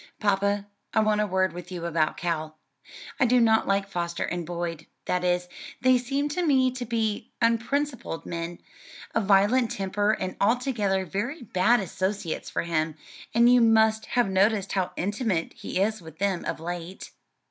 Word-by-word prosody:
"Papa, 200 0 +1 0.3
I - - +5
want 215 -1 +2
a 210 - 0
word 185 -2 +1
with 175 +1 -9
you 175 -2 -5
about 165 -2 0
Cal. 155 -2 -3 0.6
I 265 - +4
do 250 +1 +4
not 220 -1 +4
like 195 0 +1
Foster 170 -3 -3
and 175 -2 -3
Boyd; 170 -2 -4 0.2
that 180 0 0
is, 180 0 +1 0.3
they 255 -1 +4
seem 275 +4 -1
to 355 +5 -1
me 265 -5 +3
to 250 -1 -5
be 220 -1 -1
unprincipled 235 - 0
men, 170 0 -4 0.6
of 225 -3 +1
violent 210 +5 +4
temper 205 +2 0
and 185 -3 -4
altogether 210 -4 +1
very 235 - -4
bad 220 +3 +3
associates 190 -1 -3
for - - -2
him; 160 -2 -1 0.4
and 235 +1 +6
you 245 0 +6
must 220 -1 +4
have 245 -3 +2
noticed 195 +1 +2
how 190 -2 0
intimate 205 -3 -1
he - - -4
is 215 +1 0
with 160 -1 -12
them 195 -2 -1
of - - -3
late." 175 +2 -6
200 Hz, 170 wpm, -26 LUFS, 175-230 Hz, 0.6 s, and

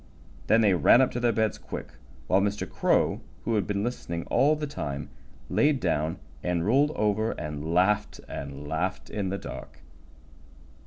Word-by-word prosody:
Then 115 +1 +5
they 105 -3 +4
ran 90 +7 +6
up 130 - +3
to 120 - -3
their 120 -1 +3
beds 110 -1 0
quick, - - -7 0.4
while 95 +7 +3
Mr. 105 +1 -1
Crow, - - +1 0.2
who 115 - 0
had 105 -5 +1
been 100 -1 -1
listening 85 -8 -3
all 140 +5 +4
the 150 0 -3
time, 75 - -5 0.4
laid 145 -2 +2
down 80 -5 0 0.2
and 85 -1 0
rolled 135 +7 +4
over 105 +1 +1
and 75 0 -5
laughed 105 +4 +2
and 70 +1 -7
laughed 85 +5 -2
in 100 -3 -2
the 100 - -2
dark. 65 - -9
100 Hz, 165 wpm, -27 LUFS, 85-115 Hz, 0.4 s, ran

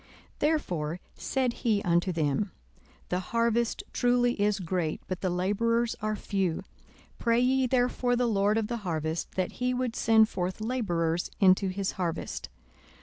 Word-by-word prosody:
42:010:002 - - -26 0.3
Therefore 180 - 0
said 260 -3 -1
he 215 -4 +2
unto 175 +2 +2
them, 165 +4 0 0.6
The 180 - 0
harvest 230 +4 0
truly 245 0 +3
is 205 0 +2
great, 175 -3 -1
but 185 -1 -4
the 185 - 0
labourers 225 +6 +1
are 215 0 0
few: 195 -4 -1 0.6
pray 230 0 +2
ye 260 +1 +3
therefore 245 0 +1
the 245 0 +1
Lord 210 -1 +2
of 225 - +1
the 235 +2 -3
harvest, 160 -5 -3
that 185 -1 -1
he 250 0 +1
would 250 -2 -1
send 220 -1 +5
forth 185 -2 -3
labourers 175 -8 -1
into 190 0 +5
his 190 +1 -2
harvest. 170 -2 -3
210 Hz, 150 wpm, -28 LUFS, 180-235 Hz, 0.6 s, send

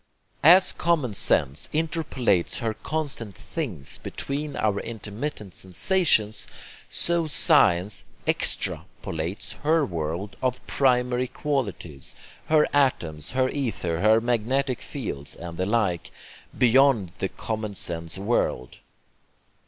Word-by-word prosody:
As 185 +4 +7
common 155 -10 +1
sense 70 -7 +1
interpolates 155 - +1
her 115 -3 -1
constant 140 -7 -4
'things' 95 - -4
between 145 +1 -3
our 105 -2 +1
intermittent 110 -1 -6
sensations, 110 - +1 0.4
so 170 -1 +1
science 105 - +3 0.2
EXTRApolates 80 +4 -2
her 155 0 +3
world 85 - -4
of 125 -1 0
'primary' 125 -1 +2
qualities, 110 - -3 0.3
her 155 -1 +5
atoms, 85 - +1
her 130 0 +2
ether, 110 - -2
her 110 +2 +5
magnetic 125 +3 0
fields, 75 - -5
and 85 -1 -8
the 95 +1 -1
like, 100 -6 0 0.5
beyond 125 -6 +4
the 95 - -1
common 110 -2 -4
sense 85 -1 -3
world. 100 - -1
115 Hz, 105 wpm, -25 LUFS, 95-140 Hz, 0.5 s, As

